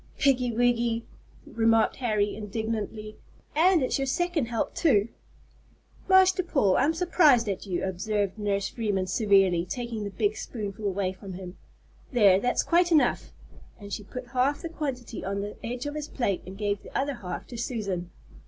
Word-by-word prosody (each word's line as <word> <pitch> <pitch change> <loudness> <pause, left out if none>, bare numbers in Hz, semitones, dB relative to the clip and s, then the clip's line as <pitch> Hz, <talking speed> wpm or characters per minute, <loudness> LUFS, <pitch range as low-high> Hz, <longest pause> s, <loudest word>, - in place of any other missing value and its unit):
"Piggy 250 -3 +2
wiggy," 235 -1 +1 0.4
remarked 225 -1 +2
Harry, 210 -5 0
indignantly; 215 0 -4 0.4
"and 340 0 +4
it's 255 - 0
your 270 - -1
second 340 -1 0
help 230 -1 -2
too!" 235 - +3 1.0
"Master 375 -1 +6
Paul, 275 - +2
I'm 290 - +2
surprised 310 -9 +4
at 200 0 -3
you," 180 -2 -2
observed 200 +2 -2
Nurse 200 -1 0
Freeman 205 -5 -1
severely, 195 -3 +3
taking 235 +3 -4
the 200 - -3
big 415 - -1
spoonful 210 -2 -5
away 190 -1 -1
from 190 0 -9
him. 180 0 -8 0.6
"There, 205 -7 +5
that's 245 +4 +1
quite 345 +1 +3
enough," 310 -3 +2 0.5
and 200 -1 -8
she 210 - -4
put 250 +4 -8
half 260 +3 0
the 335 - -4
quantity 265 -8 -5
on 200 +1 -2
the 205 +1 -5
edge 245 +2 -4
of 290 - -3
his 300 -1 -4
plate 200 -8 -1
and 190 +1 -8
gave 205 -1 -1
the - - -6
other 280 +1 0
half 185 -8 -6
to 245 - -8
Susan. 200 -7 -3
225 Hz, 165 wpm, -27 LUFS, 200-265 Hz, 1.0 s, Master